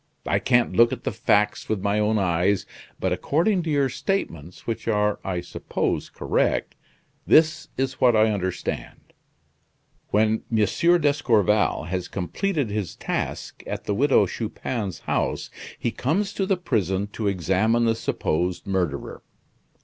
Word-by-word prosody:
I -, -, +1 dB
can't 120 Hz, -2 st, +2 dB
look 120 Hz, 0 st, +6 dB
at -, -, -5 dB
the -, -, -1 dB
facts 105 Hz, 0 st, +1 dB
with 110 Hz, -, 0 dB
my 100 Hz, +1 st, +1 dB
own 105 Hz, +1 st, +2 dB
eyes, 95 Hz, +1 st, +1 dB, 0.3 s
but -, -, 0 dB
according 180 Hz, +6 st, +1 dB
to 165 Hz, -, -4 dB
your 140 Hz, -2 st, +2 dB
statements, 90 Hz, -, -3 dB
which 115 Hz, -1 st, -4 dB
are 105 Hz, -2 st, +1 dB
I 90 Hz, -2 st, -2 dB
suppose 90 Hz, -, -3 dB
correct, -, -, 0 dB, 0.5 s
this 155 Hz, 0 st, +4 dB
is 130 Hz, 0 st, -2 dB
what 125 Hz, -2 st, +5 dB
I 110 Hz, 0 st, +4 dB
understand. 95 Hz, -3 st, -4 dB, 0.9 s
When 110 Hz, +1 st, +2 dB
M. 115 Hz, -, +1 dB, 0.4 s
d'Escorval 110 Hz, -, +2 dB
has 90 Hz, +2 st, -3 dB
completed 140 Hz, -, -2 dB
his 105 Hz, -5 st, -3 dB
task -, -, -4 dB
at -, -, -4 dB
the 105 Hz, -, -1 dB
Widow 135 Hz, +6 st, +4 dB
Chupin's 110 Hz, -4 st, -4 dB
house, -, -, -2 dB, 0.3 s
he 120 Hz, -, -1 dB
comes 180 Hz, -, -1 dB
to 195 Hz, -, -1 dB
the 195 Hz, -, +2 dB
prison 100 Hz, -, 0 dB
to 110 Hz, -, -2 dB
examine 100 Hz, +5 st, +2 dB
the 115 Hz, -, +3 dB
supposed 90 Hz, -4 st, -1 dB
murderer. 90 Hz, -8 st, -2 dB
110 Hz, 140 wpm, -24 LUFS, 95-130 Hz, 0.9 s, look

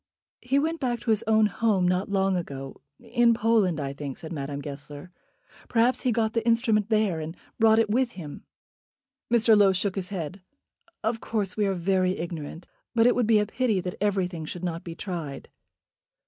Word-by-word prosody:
"He 255 Hz, +3 st, +1 dB
went 320 Hz, +3 st, 0 dB
back 240 Hz, -3 st, -1 dB
to 230 Hz, -, 0 dB
his 215 Hz, -1 st, +2 dB
own 220 Hz, 0 st, +5 dB
home 205 Hz, -2 st, +1 dB
not 180 Hz, +2 st, 0 dB
long 195 Hz, -1 st, +1 dB
ago, 135 Hz, -6 st, -6 dB, 0.2 s
in 235 Hz, 0 st, +2 dB
Poland, 215 Hz, -8 st, +2 dB
I 140 Hz, -1 st, -3 dB
think," 140 Hz, -2 st, -6 dB
said 160 Hz, -, -7 dB
Madame 140 Hz, -1 st, -4 dB
Goesler. 145 Hz, +3 st, -8 dB, 0.6 s
"Perhaps 240 Hz, +2 st, +2 dB
he 255 Hz, -, +1 dB
got 220 Hz, -1 st, 0 dB
the 230 Hz, -, 0 dB
instrument 230 Hz, -2 st, +2 dB
there, 215 Hz, -6 st, +2 dB
and 160 Hz, +2 st, -6 dB, 0.2 s
brought 220 Hz, -1 st, +5 dB
it 225 Hz, -1 st, +3 dB
with 240 Hz, +3 st, +1 dB
him." 150 Hz, -6 st, -9 dB, 0.9 s
Mr. 230 Hz, -2 st, +5 dB
Low 200 Hz, -2 st, +5 dB
shook 185 Hz, +1 st, 0 dB
his 190 Hz, -2 st, -3 dB
head. 185 Hz, -1 st, -5 dB, 0.6 s
"Of 225 Hz, +1 st, -1 dB
course 205 Hz, -4 st, -2 dB
we 210 Hz, -2 st, +1 dB
are 195 Hz, -, 0 dB
very 185 Hz, +1 st, +1 dB
ignorant; 165 Hz, -1 st, -6 dB, 0.3 s
but 230 Hz, 0 st, +5 dB
it 245 Hz, -, +6 dB
would 245 Hz, -3 st, +1 dB
be 225 Hz, -1 st, +5 dB
a 210 Hz, -, +2 dB
pity 220 Hz, -2 st, 0 dB
that 180 Hz, 0 st, -4 dB
everything 185 Hz, -5 st, 0 dB
should 175 Hz, +3 st, -7 dB
not 170 Hz, -2 st, -3 dB
be 170 Hz, -1 st, -7 dB
tried." 170 Hz, -7 st, -6 dB
200 Hz, 190 wpm, -26 LUFS, 170-225 Hz, 0.9 s, it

